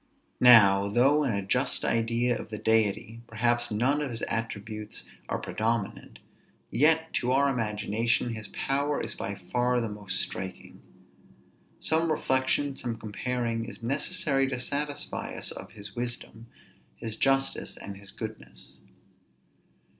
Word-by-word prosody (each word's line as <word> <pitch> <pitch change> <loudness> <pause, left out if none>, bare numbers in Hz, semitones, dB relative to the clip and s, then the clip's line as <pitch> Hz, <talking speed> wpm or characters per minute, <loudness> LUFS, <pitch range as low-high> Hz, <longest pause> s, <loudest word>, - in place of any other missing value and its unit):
Now, 100 -5 +7
though 135 +8 +4
in 135 - +1
a 100 -1 -2
just - - 0
idea 115 +2 +1
of - - -7
the 110 - -5
Deity, 110 +1 +1
perhaps 120 +1 +1
none 130 +8 +1
of 145 - -2
his 115 -2 -4
attributes 110 -1 -4 0.2
are - - 0
predominant, 110 -2 -2 0.5
yet, 160 +4 +3
to 125 0 +1
our 140 +2 +4
imagination, 115 +1 0
his 110 -2 -5
power 140 +6 -1
is - - -2
by 100 - -4
far 120 +7 0
the 115 -2 -2
most 100 -2 -1
striking. 95 -1 -5 1.0
Some 160 +1 +2
reflection, 135 -1 +1
some 120 -3 -4
comparing, 115 +1 -2
is 120 - -10
necessary 140 +1 +1
to 130 -2 -3
satisfy 145 +3 -3
us - - -1
of - - -8
his 100 -1 -6
wisdom, 120 -1 -4 0.5
his 110 - -5
justice, 135 +2 +1
and 100 - -7
his 100 0 -7
goodness. 110 +1 -8
115 Hz, 135 wpm, -28 LUFS, 105-130 Hz, 1.0 s, Now